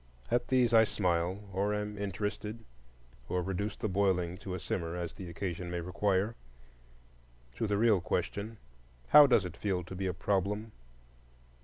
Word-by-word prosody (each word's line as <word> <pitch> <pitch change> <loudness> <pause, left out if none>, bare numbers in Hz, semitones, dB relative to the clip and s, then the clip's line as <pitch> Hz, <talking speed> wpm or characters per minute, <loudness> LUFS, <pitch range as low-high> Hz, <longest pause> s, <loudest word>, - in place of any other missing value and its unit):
At 120 0 +2
these 125 -3 +3
I 110 -1 +8
smile, 90 -1 0
or 100 +2 +1
am 105 0 -3
interested, 105 +2 -4 0.6
or 90 0 0
reduce 100 +3 -2
the - - -2
boiling 95 -3 +1
to 95 -2 -5
a - - -4
simmer, 85 0 -3
as 85 -1 -4
the 95 -4 -8
occasion 85 0 -4
may 85 0 -2
require. 95 +4 0 1.2
To 115 - 0
the 100 -1 +1
real 110 -4 +4
question, 100 +6 -2 0.5
How 150 -1 +10
does 110 -7 +4
it 85 -2 -6
feel 95 -3 -1
to 90 - -9
be 95 +1 -2
a 90 - -1
problem? 100 +4 -1
100 Hz, 160 wpm, -31 LUFS, 90-105 Hz, 1.2 s, How